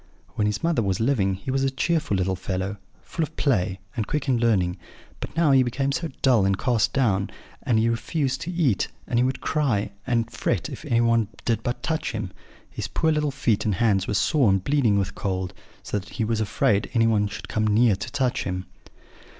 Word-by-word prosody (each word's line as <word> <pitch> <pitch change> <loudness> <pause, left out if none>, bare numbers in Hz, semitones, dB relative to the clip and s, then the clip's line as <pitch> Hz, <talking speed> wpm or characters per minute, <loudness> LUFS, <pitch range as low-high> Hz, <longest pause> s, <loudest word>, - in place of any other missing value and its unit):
When 105 - 0
his 105 +8 -2
mother 165 -7 +2
was 95 -3 0
living 110 -6 +2
he 100 +7 -5
was 135 0 +1
a 135 - +2
cheerful 145 - 0
little 95 +1 0
fellow, 95 +2 -3 0.3
full 165 - -5
of 160 0 -2
play, 95 - +1 0.2
and 110 -4 -2
quick 150 -1 -2
in 125 -3 +2
learning; 95 -6 +2 0.4
but - - -7
now 165 -4 +4
he 135 -1 +6
became 135 +3 0 0.3
dull 125 -6 +5
and 95 0 +2
cast 120 -3 +1
down, 100 -8 +1 0.3
and 115 - +1
he 110 +1 +3
refused 130 +3 -1
to 165 +3 -4
eat; 155 - +1 0.2
and 120 - 0
he - - +4
would 130 +1 -1
cry 115 -10 0 0.2
and 115 -2 0
fret - - -1
if - - -8
anyone 115 -2 +2 0.2
did 115 -2 +1
but 120 +2 -3
touch 160 -3 -1
him. 105 -4 -4 0.4
His - - -5
poor 160 - +1
little 150 -1 +1
feet 130 -6 0
and 105 -3 0
hands 100 -2 +2
were 105 - -1
sore 140 0 +3
and 95 -1 +2
bleeding 125 -5 +2
with 100 -1 -1
cold; 95 -2 -3 0.3
so 105 - -2
that 100 - -13
he 110 0 -1
was 110 0 0
afraid 100 -1 +1
anyone 115 -3 +3
should 100 - -8
come 110 0 0
near 110 0 +4
to 95 - -6
touch 130 -3 0
him. 90 0 -3
115 Hz, 205 wpm, -24 LUFS, 100-135 Hz, 0.4 s, he